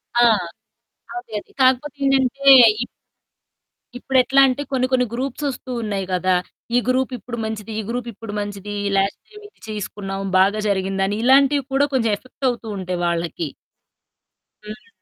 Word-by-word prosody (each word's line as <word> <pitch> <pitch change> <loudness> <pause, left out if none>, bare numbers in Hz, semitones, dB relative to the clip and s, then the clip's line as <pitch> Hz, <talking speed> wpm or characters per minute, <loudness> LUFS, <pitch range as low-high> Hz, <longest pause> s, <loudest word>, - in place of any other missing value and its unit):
ఆ! 240 - +4 1.0
అదే, 365 -11 -9
అదే. - - -18
కాకపోతే 260 +2 +2
ఏంటంటే 270 0 +1 0.4
ఇప్... - - -10 1.1
ఇప్పుడెట్లా 260 +1 +3
అంటే 260 +2 -1
కొన్ని 255 -1 +1
కొన్ని 250 -1 +3
గ్రూప్స్ 265 +3 -4
వస్తూ 255 0 -7
ఉన్నాయి 200 -3 -3
గదా! 185 +1 +1 0.4
ఈ - - +5
గ్రూప్ 260 +1 +1
ఇప్పుడు 240 -1 -8
మంచిది. 220 0 -5
ఈ - - -1
గ్రూప్ 240 0 -3
ఇప్పుడు 210 0 -9
మంచిది. 205 0 -5 0.2
లాస్ట్ 195 +1 0
టైమ్ 420 -1 -14
ఇది - - -36
చేసుకున్నాం 195 -2 -5
బాగా 200 +3 +3
జరిగిందని 195 +1 0
ఇలాంటివి 275 +1 +4
కూడా 280 +1 +3
కొంచెం 230 -4 +2
ఎఫెక్ట్ 255 +2 -5
అవుతూ 235 -2 -5
ఉంటాయి 180 -1 -4
వాళ్ళకి. 170 -1 -2 1.2
హ్మ్. 215 - -10
235 Hz, 145 wpm, -21 LUFS, 200-265 Hz, 1.2 s, ఈ